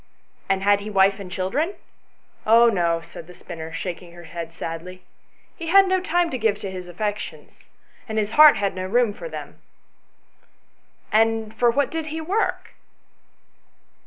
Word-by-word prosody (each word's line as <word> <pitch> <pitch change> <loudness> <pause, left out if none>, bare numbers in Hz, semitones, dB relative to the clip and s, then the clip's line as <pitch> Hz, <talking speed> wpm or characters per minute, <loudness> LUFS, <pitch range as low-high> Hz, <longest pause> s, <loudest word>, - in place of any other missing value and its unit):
"And 195 0 +1
had 205 0 +4
he 205 +1 -7
wife 195 0 +3
and 185 -2 -8
children 275 - -1 0.2
?" - - -41
" - - -22
Oh 235 +1 +7
no," 170 -5 +1
said 165 0 -12
the 180 - -13
spinner, 165 -1 -8
shaking 170 +1 -6
her 175 0 -12
head 165 0 -7
sadly; 165 +3 -7 0.3
" - - -37
he 330 - -5
had 390 +3 +6
no 375 0 +1
time 350 -1 +1
to 255 - -3
give 215 -2 +1
to 195 - -5
his 185 -1 -7
affections, 205 +4 -6 0.4
and 220 - -3
his 210 -1 0
heart 300 -2 +8
had 200 -1 -1
no 185 0 -4
room 235 +1 +2
for - - -8
them." - - -9 1.5
"And 225 0 +2
for 240 +2 +3
what 280 +4 +1
did 320 -1 -3
he 315 +1 -4
work 380 +8 -1
205 Hz, 175 wpm, -23 LUFS, 180-255 Hz, 1.5 s, heart